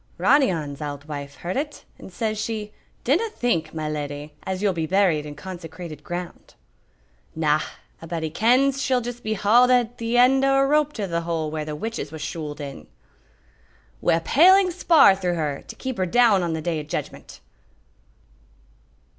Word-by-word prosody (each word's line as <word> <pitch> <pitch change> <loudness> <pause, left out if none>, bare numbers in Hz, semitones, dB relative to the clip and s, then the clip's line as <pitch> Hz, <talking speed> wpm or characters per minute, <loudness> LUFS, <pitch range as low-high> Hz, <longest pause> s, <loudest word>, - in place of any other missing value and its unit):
"Ronny 285 -5 +4
On's 150 -4 -5
auld 145 -1 -6
wife 140 -2 -6
heard 175 +2 -5
it, 295 +2 -4
and - - -11
says 215 +3 -2
she, 215 -2 -4 0.3
'Dinna 350 - +1
think, 175 - -1
my 155 -1 -4
leddy, 145 0 -5
as 190 +1 -3
you'll 200 -2 +2
be 165 -2 -2
buried 175 -5 +2
in 145 - -8
consecrated 165 -2 -9
ground.'" 175 0 -7 0.8
"Na, 155 -1 +2 0.4
a'body 165 -1 -4
kens 260 - +3
she'll 255 -3 +1
just 240 0 -6
be 215 -1 -2
hauled 230 +5 +4
at 245 -1 +2
the 230 +1 0
end 260 +2 +5
o' 270 0 +3
a 270 0 +4
rope 300 +1 +2
to 210 - -3
the 170 -2 -2
hole 165 -2 -2
where 155 -1 -3
the 150 -1 -5
witches 220 -5 -5
was 160 -1 -7
shooled 155 -2 -5
in." 140 - -8 1.1
"Wi' - - +3
a 165 - -1
paling 365 - +5
spar 330 - +5
through 180 -2 -1
her, 150 -4 -2
to - - -9
keep 260 -5 -5
her 185 - +1
down 225 -1 +4
on 170 -2 -1
the 160 -1 -4
day 165 -2 -1
o' - - -5
judgment." 150 - -6
180 Hz, 180 wpm, -23 LUFS, 155-245 Hz, 1.1 s, end